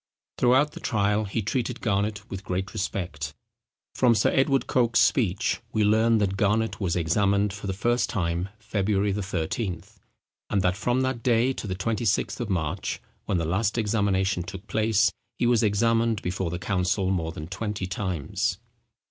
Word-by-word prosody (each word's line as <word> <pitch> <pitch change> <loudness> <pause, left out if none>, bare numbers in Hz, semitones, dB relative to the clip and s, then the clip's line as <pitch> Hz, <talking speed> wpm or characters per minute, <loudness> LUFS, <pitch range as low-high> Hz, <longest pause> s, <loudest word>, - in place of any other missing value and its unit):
Throughout 130 +4 +4
the - - -9
trial 105 0 +1
he 105 +2 -2
treated 125 +3 -2
Garnet 105 0 -1
with 95 +1 -6
great 95 +1 -3
respect. 80 -6 -3 0.6
From 120 -2 +4
Sir 105 - +3
Edward 135 0 +2
Coke's 120 -2 +2
speech 110 -4 +2
we 110 - +2
learn, 110 +2 +4
that 100 -2 0
Garnet 110 +3 +1
was 90 -4 0
examined 100 +4 +2
for 100 0 -7
the - - 0
first 120 +5 +1
time 90 -2 -1
February 105 -2 0
13th, 95 +1 -3 0.5
and 100 -2 +1
that 90 0 +2
from 120 +5 0
that 130 -2 -1
day 120 +2 +3
to 110 - -6
the 95 - -2
26th 110 +2 0
of 120 -3 -3
March, 90 0 -2 0.3
when 95 - 0
the 85 - -1
last 100 +7 0
examination 100 -4 +1
took 95 +2 -8
place, 110 0 +2 0.3
he - - +1
was 120 -2 +4
examined 115 +1 +2
before 90 0 -2
the 85 - -3
council 95 +1 0
more 80 -4 -1
than 75 -1 -7
twenty 100 +2 -4
times. 95 +4 -2
100 Hz, 165 wpm, -26 LUFS, 95-115 Hz, 0.6 s, Throughout